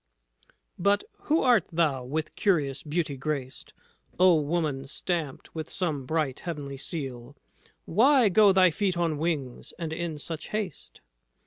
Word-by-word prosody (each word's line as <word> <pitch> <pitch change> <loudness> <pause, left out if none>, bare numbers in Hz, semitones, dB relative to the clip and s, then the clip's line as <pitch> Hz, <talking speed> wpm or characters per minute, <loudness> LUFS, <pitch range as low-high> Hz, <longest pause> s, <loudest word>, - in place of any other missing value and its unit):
"But 200 +3 +3 0.2
who 315 +2 +2
art 240 -8 +4
thou, 155 -6 +1
with 155 +5 -3
curious 145 -9 +1
beauty 150 -1 -2
graced, 135 -2 -4 0.5
O 185 -1 +7
woman, 145 -3 -1
stamped 160 -1 -4
with 160 -1 -5
some 150 -8 -2
bright 155 -4 -1
heavenly 145 -5 -5
seal 135 -3 -6 0.5
Why 250 - +5
go 205 +1 +6
thy 185 -2 +5
feet 185 +1 0
on 165 -4 0
wings, 150 -6 -3
and 160 -2 -4
in 165 -2 -3
such 160 +1 -5
haste?" 210 -7 -5
160 Hz, 135 wpm, -27 LUFS, 140-180 Hz, 0.5 s, O